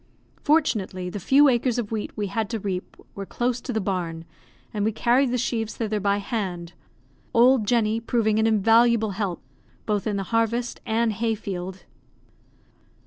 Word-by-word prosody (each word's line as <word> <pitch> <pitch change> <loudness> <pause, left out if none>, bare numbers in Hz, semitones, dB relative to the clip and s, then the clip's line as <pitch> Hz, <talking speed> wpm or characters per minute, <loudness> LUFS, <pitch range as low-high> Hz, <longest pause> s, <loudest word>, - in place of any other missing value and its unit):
Fortunately, 205 - +1
the 205 - -5
few 280 +9 +5
acres 245 -1 +2
of 230 -3 -3
wheat 220 -2 -2
we 210 - -1
had 205 +2 -2
to 230 - -2
reap 190 -2 -5 0.2
were 200 - -6
close 240 +4 -2
to 255 - -5
the 220 - 0
barn, 175 -4 -3 0.5
and 210 -2 -1
we 220 - +2
carried 245 +4 +2
the 250 - 0
sheaves 225 -2 -2
thither 215 -2 -1
by 200 0 +1
hand; 185 -5 -4 0.6
old 240 -2 +5
Jenny 225 -1 +2
proving 220 -2 +1
an 220 - +3
invaluable 225 +1 +4
help, 195 -3 -3 0.4
both 210 0 -1
in 210 - -1
the 195 - -2
harvest 230 +1 0
and 225 0 +1
hay 225 +2 0
field. 190 -2 -6
220 Hz, 165 wpm, -24 LUFS, 200-235 Hz, 0.6 s, few